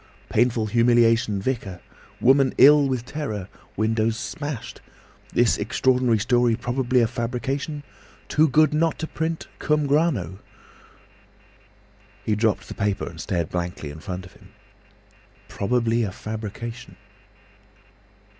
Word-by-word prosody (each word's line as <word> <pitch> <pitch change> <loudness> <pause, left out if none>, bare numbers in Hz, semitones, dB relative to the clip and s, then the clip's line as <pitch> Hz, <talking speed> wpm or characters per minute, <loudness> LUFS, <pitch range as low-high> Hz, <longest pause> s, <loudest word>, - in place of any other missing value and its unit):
Painful 115 -1 +2
humiliation—vicar. 115 -3 +2 0.4
Woman 135 +1 +4
ill 145 +1 +7
with 130 -3 -2
terror! 110 -11 -4 0.3
Windows 110 +1 +1
smashed. 145 -2 -6 0.5
This - - +2
extraordinary 125 -3 +2
story 120 +1 +2
probably 125 +1 0
a 115 - +3
fabrication. 135 +5 -3 0.4
Too 155 +2 +3
good 155 +2 +3
not 160 +1 +1
to - - -3
print—cum 160 -2 -2
grano!" 140 - 0 1.9
He 110 - +1
dropped 110 0 0
the - - -7
paper 100 -1 -1
and 85 -1 -8
stared 85 -4 -2
blankly 85 -4 -4
in 75 - -10
front 90 +2 -6
of 90 - -15
him. - - -19 1.0
"Probably 115 +2 0
a 105 -4 -1
fabrication!" 110 +3 -7
120 Hz, 110 wpm, -24 LUFS, 105-135 Hz, 1.9 s, ill